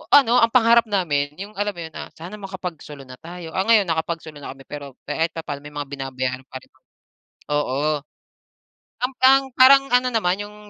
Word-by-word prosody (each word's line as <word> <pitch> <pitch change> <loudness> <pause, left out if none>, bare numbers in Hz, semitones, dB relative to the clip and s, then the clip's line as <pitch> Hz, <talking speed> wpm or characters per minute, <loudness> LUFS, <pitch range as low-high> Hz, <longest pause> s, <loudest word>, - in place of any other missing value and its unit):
Ano, 250 -3 +6
ang 230 - +5
pangarap 235 -1 +5
namin 150 -8 0
yung 200 +2 -7
alam 205 0 0
mo 170 - -7
yun 160 - -9
na, - - -6
"Sana 175 +6 -9
makapagsolo 180 -7 -7
na 130 -1 -12
tayo." 170 0 -9
Ah, 190 +2 0
ngayon 225 -3 +6
nakapagsolo 160 -1 -3
na - - -7
kami, 135 - -15
pero 140 -3 -8
kahit 165 +1 -1
papa'no 155 -3 -5
may 150 - -10
mga 145 -1 -4
binabayaran 130 -1 -4
pa - - -16
rin. - - -23 0.8
Oo. 145 +1 0 1.0
Ang 255 - 0
ang 270 +1 +7 0.2
parang 275 +1 +7
ano 250 +1 +4
naman, 190 -6 +1
yung 205 0 -11
170 Hz, 185 wpm, -22 LUFS, 145-215 Hz, 1.0 s, ang